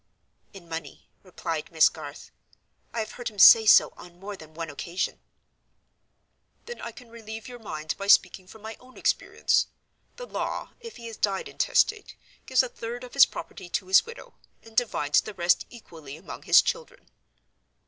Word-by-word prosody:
"In 190 -4 -14
money," 165 0 -8
replied 165 -4 -5
Miss 160 -2 +6
Garth. 150 -2 -9 0.6
"I 230 - -2
have 215 0 -6
heard 245 0 -5
him 210 - -18
say 220 +4 +9
so - - +7
on 175 0 -15
more 200 +2 -7
than 155 -3 -15
one 165 -2 -5
occasion." 170 +5 -4 1.5
"Then 480 - -8
I - - -6
can 245 -3 -15
relieve 225 0 -9
your 245 -1 -10
mind 155 -8 -5
by 200 - -5
speaking 190 -2 +4
from 215 +3 -15
my 220 0 -7
own 255 0 -18
experience. - - +1 0.5
The - - -8
law, - - -4
if 460 -2 -10
he 235 - -11
has 230 -1 -8
died 195 -2 -1
intestate, 430 0 0 0.3
gives 260 0 +4
a - - -3
third 240 +1 -7
of 250 - -11
his 275 - +7
property 185 -3 -9
to 185 - -2
his 190 +1 +5
widow, 465 +1 -12 0.3
and 225 0 -16
divides 180 -11 +2
the 215 - -9
rest 175 0 +2
equally 160 - -12
among 170 - -10
his - - +6
children." 485 +1 -5
210 Hz, 175 wpm, -26 LUFS, 170-245 Hz, 1.5 s, say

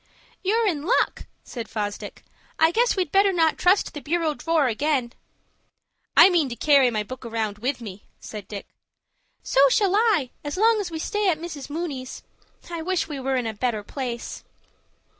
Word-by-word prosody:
"You're 445 +4 +2
in 330 -8 0
luck," 315 - 0 0.2
said 235 -3 -7
Fosdick. 205 -2 -5 0.3
"I 320 +1 +4
guess 475 +6 +2
we'd 370 -2 -1
better 395 0 +4
not 325 -3 +2
trust 370 +3 +3
the 295 - -7
bureau 320 +2 0
drawer 325 0 +1
again." 255 0 0 1.0
"I - - +10
mean 325 -6 +2
to 240 - -5
carry 275 0 +4
my 215 -3 -1
book 255 +5 -9
round 220 -3 -3
with 255 +2 -2
me," 205 -3 -9
said 210 -3 -9
Dick. 205 -2 -7 0.8
"So 275 +1 +4
shall 390 +6 +2
I, 420 - +2
as 290 +3 -4
long 440 +1 +4
as 380 - -4
we 325 - -5
stay 415 +4 0
at 330 - +1
Mrs. 310 -4 -7
Mooney's. 290 -5 -5 0.5
I 335 -1 -4
wish 370 +1 -1
we 290 -3 -5
were 265 0 -1
in 250 -2 -1
a 225 - -2
better 215 -1 -2
place." 240 0 -5
290 Hz, 180 wpm, -24 LUFS, 240-350 Hz, 1.0 s, I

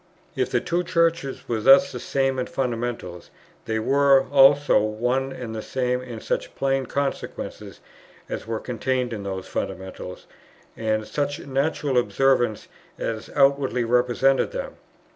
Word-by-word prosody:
If - - 0
the - - +1
two 175 +1 -1
Churches 165 -5 0
were 115 -2 -1
thus 135 +10 +6
the - - -6
same 135 -1 0
in 125 - -2
fundamentals, 115 -8 -4 0.4
they 110 - -1
were 135 +3 +4
also 145 +1 +6
one 125 +5 -1
and 125 -4 -6
the 110 - -4
same 125 0 -1
in 120 -3 -8
such - - -3
plain 135 -1 0
consequences 140 -1 -4 0.5
as - - -5
were 115 -1 -2
contained 125 0 -2
in 105 - -5
those 95 -1 -5
fundamentals 95 -1 -6 0.5
and 110 -1 0
in - - -10
such 145 +2 -2
natural 140 -1 0
observances 120 -3 +1 0.3
as 115 0 -4
outwardly 135 -3 +3
represented 125 +3 +2
them. - - -5
130 Hz, 145 wpm, -24 LUFS, 115-140 Hz, 0.5 s, thus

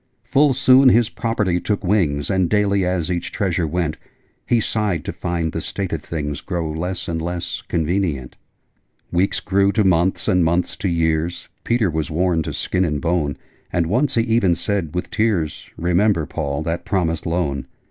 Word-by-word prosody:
Full 140 0 +3
soon 130 +1 +6
his 120 -2 +4
property 105 -6 0
took 105 +2 -2
wings: 85 -8 +1
And 95 -2 +2
daily, 100 -2 +2
as 90 -1 -1
each 85 -1 -2
treasure 90 -4 0
went, 85 -1 -1 0.5
He 120 - +3
sighed 105 -7 -1
to - - -3
find 85 -2 -2
the 80 - -3
state 95 +2 -3
of 80 - -2
things 75 -3 -4
Grow 85 -4 -3
less 90 +4 -4
and 80 -1 -2
less 85 +1 -4
convenient. 80 -5 -1 0.8
Weeks 95 +3 +1
grew 100 0 +2
to 110 - +3
months, 95 0 +2
and 90 -1 +3
months 85 +2 +1
to 95 - -1
years: 85 +1 -1
Peter 115 -6 +1
was 80 -1 -2
worn 85 +1 +1
to - - -4
skin 90 - 0
and 75 -4 0
bone: 85 -4 0 0.3
And 85 - +1
once 130 - +1
he 115 - +4
even 115 -6 +2
said, 85 -2 -2
with 90 - -3
tears, 105 -9 0
'Remember, 90 0 +2
Paul, 70 -1 -3
that 85 +1 -2
promised 85 -5 -1
Loan!' 80 -6 -1
90 Hz, 175 wpm, -21 LUFS, 80-100 Hz, 0.8 s, soon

